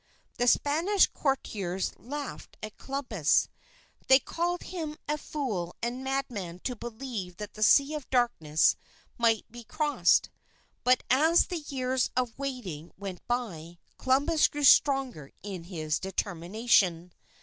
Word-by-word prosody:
The 245 - +2
Spanish 330 +10 +3
courtiers 195 -10 -2
laughed 285 +3 -7
at 215 -1 -8
Columbus; 250 - +1 0.6
they 265 - +8
called 345 +6 -2
him 315 -4 -5
a 300 - +1
fool 215 - -4
and 245 +3 -3
madman 245 -10 -3
to 250 - -2
believe 225 -6 -6
that 210 -1 -7
the 215 - -10
Sea 280 +7 +5
of 300 -4 -6
Darkness 200 - +2 0.4
might 225 -2 +2
be 240 0 -10
crossed. 295 +6 +2 0.5
But 255 0 +3
as 320 +6 +5
the 355 -3 -4
years 260 -3 -1
of 250 -3 0
waiting 240 - -5
went 195 -2 -6
by, 175 -9 -3 0.2
Columbus 285 +5 +3
grew 295 0 -5
stronger 265 - +4
in 190 -5 -6
his 155 -4 -2
determination. 185 -1 0
245 Hz, 125 wpm, -28 LUFS, 190-275 Hz, 0.6 s, they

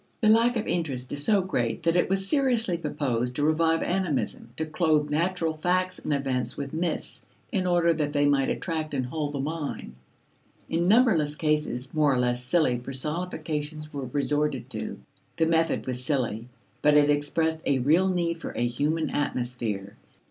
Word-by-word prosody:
The 215 - +3
lack 230 +2 +4
of 220 - -2
interest 135 -7 -2
is 145 0 -3
so 205 +3 +3
great 125 -11 -2
that 165 0 +2
it 175 - +2
was 195 0 0
seriously 245 - +2
proposed 125 -7 -2
to 145 - 0
revive 160 +1 +2
animism, 175 -6 -1
to 160 - -1
clothe 155 -2 +1
natural 165 +1 0
facts 185 +3 0
and - - -4
events 130 -3 -1
with 140 0 -5
myths 165 +1 -3 0.3
in 190 -4 0
order 175 -1 +3
that 150 -2 -1
they 145 -1 +2
might 140 -2 +3
attract 160 -3 -3
and 130 -2 0
hold 145 +2 -3
the 140 - -3
mind. 150 - -4 0.7
In 170 +2 0
numberless 195 - +4
cases, 150 -5 -1
more 150 -2 +3
or 130 - +2
less 125 0 0
silly 125 -2 +2
personifications 150 +2 -4
were 140 -2 -4
resorted 145 +3 -1
to. - - -5 0.4
The 165 - +3
method 165 0 +1
was 125 -1 -2
silly, 125 -5 -1 0.3
but 150 0 +5
it 145 0 +5
expressed 160 +2 0
a 140 - +3
real 155 +9 +3
need 170 -2 -1
for - - -5
a 120 - 0
human 150 +7 0
atmosphere. 120 -8 -3
150 Hz, 170 wpm, -26 LUFS, 135-170 Hz, 0.7 s, but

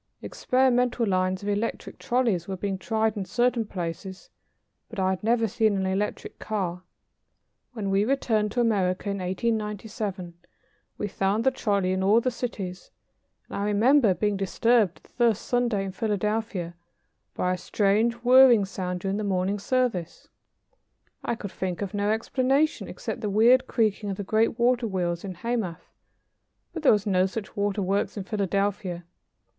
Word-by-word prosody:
Experimental 250 -2 +1
lines 185 -1 0
of 205 - -2
electric 205 +3 -3
trolleys 230 -9 0
were 190 -1 -4
being 195 0 -3
tried 220 +3 0
in 200 - -3
certain 240 +2 0
places, 185 +1 -6 0.6
but 225 - -10
I 190 -1 +1
had 190 - -4
never 230 0 +2
seen 220 -2 +1
an 190 - -1
electric 195 +2 -3
car. 185 -5 -3 0.9
When 205 -5 -3
we 195 +1 +3
returned 220 -4 +1
to 245 - +1
America 200 -3 +1
in 200 - -3
1897, 210 -1 -3 0.6
we 210 - -2
found 195 +3 0
the 265 - +4
trolley 200 -7 0
in 185 0 0
all 205 +4 +5
the 255 +2 -1
cities, 195 -7 -5 0.6
and - - -8
I 200 - -1
remember 215 +1 +4
being 210 0 0
disturbed, 205 0 +1
the - - -22
first 235 -4 +1
Sunday 240 -5 0
in 190 - -4
Philadelphia, 210 -3 -2 0.6
by 180 0 0
a - - -2
strange 210 +5 +1
whirring 250 -4 +7
sound 180 -2 -4
during 195 +1 -1
the 215 - -2
morning 195 0 0
service. 215 -6 -1 0.9
I - - -1
could 200 -4 -7
think 185 +1 -3
of 200 - -5
no 205 0 0
explanation 260 +7 +1
except - - -6
the 210 - -2
weird 240 +6 +4
creaking 215 -3 0
of 195 - -3
the 205 - -4
great 220 +3 +1
water 240 0 +2
wheels 175 -4 -2
in 190 -2 -6
Hamath, 215 -4 -4 0.8
but 330 - -5
there 300 - +6
were 215 - +5
no 185 -2 +2
such 200 +1 -7
waterworks 200 0 -1
in 200 - -3
Philadelphia. 195 -3 -2
205 Hz, 160 wpm, -26 LUFS, 190-230 Hz, 0.9 s, whirring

